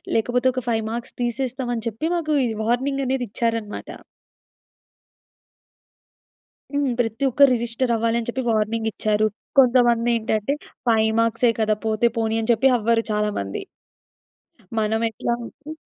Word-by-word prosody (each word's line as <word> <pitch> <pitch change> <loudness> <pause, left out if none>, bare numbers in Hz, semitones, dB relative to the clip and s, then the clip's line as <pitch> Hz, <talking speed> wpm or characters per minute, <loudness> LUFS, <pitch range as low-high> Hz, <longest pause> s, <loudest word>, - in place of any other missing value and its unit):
లేకపోతే 245 +3 +1
ఒక 255 -2 -3
5 225 -1 0
మార్క్స్ 235 +1 -6
తీసేస్తాం 255 +1 -2
అని 225 0 -5
చెప్పి 225 +9 -5
మాకు 310 -3 0
ఈ - - +1 0.2
వార్నింగనేదిచ్చారన్నమాట. 245 -4 -1 2.8
హ్మ్. 285 -2 +1
ప్రతి 230 +2 -1
ఒక్కరు 280 +2 +5
రిజిస్టర్ 235 +1 -1
అవ్వాలని 230 +1 0
చెప్పి 260 +2 -2
వార్నింగిచ్చారు. 215 -1 0 0.3
కొంతమందేంటంటే 235 -2 +3 0.4
5 220 -1 +3
మార్క్సే 230 +1 +3
కదా! 215 0 +2
పోతే 220 +2 +2
పోనీ 225 0 0
అని 225 - +1
చెప్పి 235 +4 +4
అవ్వరు 230 +1 +2
చాలా 210 0 +1
మంది. 100 0 -4 1.2
మనం 220 +1 0
ఎట్లా 230 +2 -2
అంటే 300 +6 -10
230 Hz, 115 wpm, -22 LUFS, 220-250 Hz, 2.8 s, ఒక్కరు